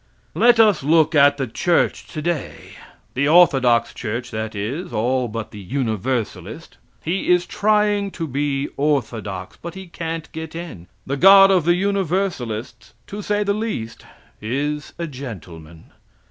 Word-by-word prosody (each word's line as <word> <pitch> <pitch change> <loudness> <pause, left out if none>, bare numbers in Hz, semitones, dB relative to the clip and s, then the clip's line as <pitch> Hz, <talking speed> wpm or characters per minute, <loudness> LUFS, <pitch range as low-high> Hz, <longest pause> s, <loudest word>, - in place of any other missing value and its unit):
Let 240 -1 +4
us 210 -6 +5
look 160 +3 +3
at 145 -1 +5
the 135 - -1
church 170 +9 0
today. 155 -1 -4 0.4
The 140 +3 0
orthodox 135 -8 +4
church 120 +1 -5
that 110 -1 -4
is, 130 - -4
all 125 +3 0
but 115 0 -6
the 105 - -10
Universalist. 110 - -3 0.3
He 180 +4 -2
is 180 0 +4
trying 210 0 +1
to 165 - -2
be 140 0 -2
orthodox, 110 -10 -2
but 170 +1 -7
he 190 0 -8
can't 165 -2 -5
get 160 0 -7
in. 165 - -8 0.2
The 140 +1 -3
God 195 +4 +8
of 180 -5 +2
the 175 0 +4
Universalists, 180 - -2
to 205 +1 -7
say 210 +1 0
the 200 0 0
least, 205 - -4 0.4
is 145 +7 -3
a 170 - -3
gentleman. 90 - -10
145 Hz, 145 wpm, -21 LUFS, 115-180 Hz, 0.4 s, God